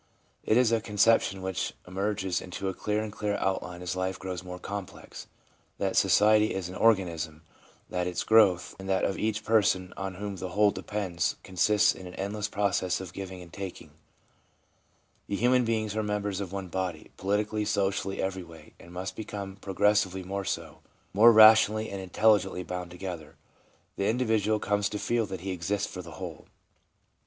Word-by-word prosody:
It 110 - +2
is 125 -2 +4
a 115 -1 +2
conception 105 -2 +2
which 95 -1 -3
emerges 95 0 -1
into 95 +1 -4
clearer 105 +3 -1
and 110 - -5
clearer 105 -1 -2
outline 90 -2 -2
as 90 0 -3
life 95 0 -2
grows 95 -1 -5
more 90 0 -7
complex, 100 +1 -8 0.5
that - - -1
society 105 0 +4
is 95 -3 -3
an - - -8
organism; 85 -8 +1 0.4
that 90 -1 -2
its 90 - -2
growth 100 -6 +4
and 95 0 -7
that 95 -1 +2
of 95 - -2
each 110 -1 -1
person 95 -4 +2
on 95 -1 -5
whom 100 0 -5
the 95 0 -5
whole 105 -1 +5
depends 95 -6 -2
consists 105 +3 +3
in 95 - -10
an 90 - -10
endless 105 +2 -3
process 100 -3 0
of 95 -2 -8
giving 95 -2 -7
and 85 - -16
taking; 100 -2 -7 1.4
that 100 - 0
human 125 +3 +3
beings 110 -2 -1
are 110 - +1
members 105 -2 -2
of 95 -3 -5
one 95 -1 -4
body 90 -3 -4
— - - -39
politically, 105 +2 0
socially, 100 -2 -1
every 95 0 -2
way 85 -1 -14
— - - -39
and 85 - -14
must 90 +1 -5
become 100 -3 -6
pro 95 -1 -7
gressively 100 -2 +2
more 100 +1 -3
so, - - -4 0.3
more 110 +4 +8
rationally 110 0 +7
and 100 -1 -5
intelligently 95 -1 +2
bound 90 0 -5
together. 90 -3 -7 0.6
The 100 - 0
individual 110 -3 +1
comes 105 0 0
to 105 - -4
feel 115 +1 0
that 95 -3 -6
he 95 +1 -4
exists 95 +3 -1
for 90 - -5
the 85 -1 -11
whole. - - -8
100 Hz, 180 wpm, -28 LUFS, 90-105 Hz, 1.4 s, more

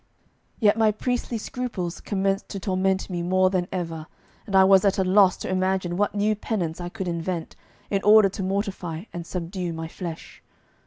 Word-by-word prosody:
Yet 215 0 +3
my 220 -1 +5
priestly 245 +2 -2
scruples 215 -7 -4
commenced 195 -1 -1
to 200 - -5
torment 190 0 0
me 175 -2 -3
more 185 +1 +2
than 180 -2 0
ever, 165 -3 -4 0.4
and 200 - -2
I 190 - +8
was 190 0 +6
at 200 -1 +2
a 190 - +2
loss 190 0 +4
to - - -6
imagine 185 -1 0
what 205 +2 0
new 210 +1 +2
penance 180 -6 -3
I 175 - -4
could 190 -1 -5
invent 170 0 -3 0.4
in 195 -1 +1
order 210 0 +7
to 195 - -6
mortify 190 -4 -3
and 170 -1 -6
subdue 180 0 -4
my 160 0 -5
flesh. 165 0 -8
190 Hz, 180 wpm, -25 LUFS, 175-200 Hz, 0.4 s, I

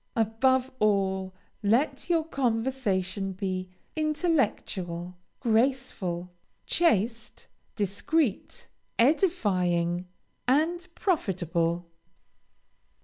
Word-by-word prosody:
Above 255 +4 +2
all, 190 -2 +1 0.3
let 260 - +1
your 330 -2 +3
conversation 225 - -1
be 185 -1 -3 0.3
intellectual, 230 - 0 0.2
graceful, 225 -8 0 0.3
chaste, 230 - +1 0.3
discreet, 210 - -1 0.3
edifying, 185 - +2 0.4
and 330 +7 +2
profitable. 175 - 0
220 Hz, 60 wpm, -28 LUFS, 185-270 Hz, 0.4 s, your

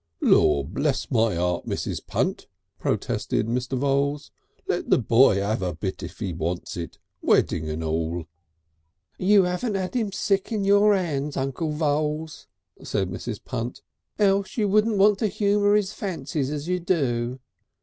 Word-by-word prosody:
"Lor 70 -2 +4
bless 135 - -1
my 115 -5 +2
heart, 90 0 -1
Mrs. - - -3
Punt!" - - -1 0.3
protested - - -1
Mr. 125 +3 -2
Voules, 140 +2 0 0.4
"let - - -2
the - - +5
boy 115 -3 +4
'ave 105 -1 -1
a 90 -3 -2
bit 95 +3 -4
if - - -8
he 95 -5 -3
wants 85 +5 -3
it 85 -2 -6 0.2
wedding 80 -1 +2
and 80 +1 -3
all!" 80 +1 -2 0.9
"You 195 0 +5
'aven't 190 +5 -1
'ad 190 +4 -3
'im 220 -5 0
sick 195 +1 0
on 215 -3 0
your 205 +1 +5
'ands, 150 -6 -2
Uncle 135 +4 -2
Voules," 150 +1 -1 0.3
said 95 -3 -2
Mrs. 105 +3 -6
Punt. 120 -1 -4 0.3
"Else 200 0 +1
you 210 -3 +2
wouldn't 215 +2 +3
want 200 +1 +5
to 220 - +2
humour 205 0 +2
his 210 -1 +1
fancies 150 -7 -3
as 150 +1 -4
you 180 0 0
do...." 130 -8 0
145 Hz, 155 wpm, -25 LUFS, -, 0.9 s, the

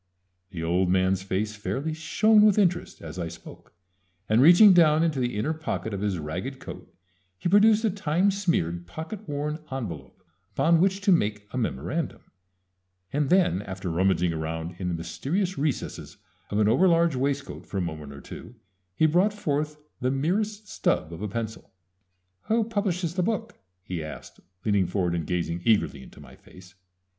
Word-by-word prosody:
The 85 -5 -6
old 90 +2 +1
man's 95 +1 +2
face 100 +3 -2
fairly 135 +9 -3
shone 210 +7 +3
with 210 -1 +5
interest 180 -4 0
as 80 +2 -7
I 85 - -2
spoke, 85 - -12 0.6
and 110 +3 +4
reaching 175 +7 +8
down 160 -2 +5
into 155 -5 0
the 120 -3 -1
inner 130 +10 0
pocket 155 -8 -4
of 100 - -3
his 100 -3 -1
ragged 90 - -5
coat - - -10 0.5
he - - -3
produced 210 +4 +5
a 215 - +2
time 185 +1 +1
smeared, 85 - -1
pocket 175 - -7
worn 150 +2 -2
envelop 95 - -6 0.3
upon 165 0 +4
which 195 +1 +2
to 200 -1 +3
make 105 - +1
a - - -3
memorandum, 120 - -3 0.9
and 145 -1 0
then 180 - +3
after 95 -3 -5
rummaging 90 0 +2
around 80 +2 -4
in 90 - -3
the 90 - -1
mysterious 175 - -2
recesses 145 -2 -3 0.3
of 100 - -2
an 105 -1 +3
over 130 - +4
large 170 -3 +3
waistcoat 140 +2 -2
for 100 - -5
a - - +1
moment 80 -4 -5
or 70 - -10
two 125 - -10 0.4
he 160 - +3
brought 180 +7 +3
forth 150 -6 -2 0.2
the 125 - 0
merest 205 +10 -1
stub 80 - -1
of 85 - -8
a 105 - -2
pencil. 110 -1 -6 0.7
"Who 225 +1 +2
publishes 195 -6 -1
that 180 - 0
book?" 225 +4 -2 0.2
he 90 -4 -4
asked, 75 - -9 0.3
leaning 100 -4 +2
forward 90 -1 -1
and 85 -3 -2
gazing 85 -1 -2
eagerly 110 - +2
into - - -14
my - - -13
face. 90 0 -17
130 Hz, 170 wpm, -26 LUFS, -, 0.9 s, reaching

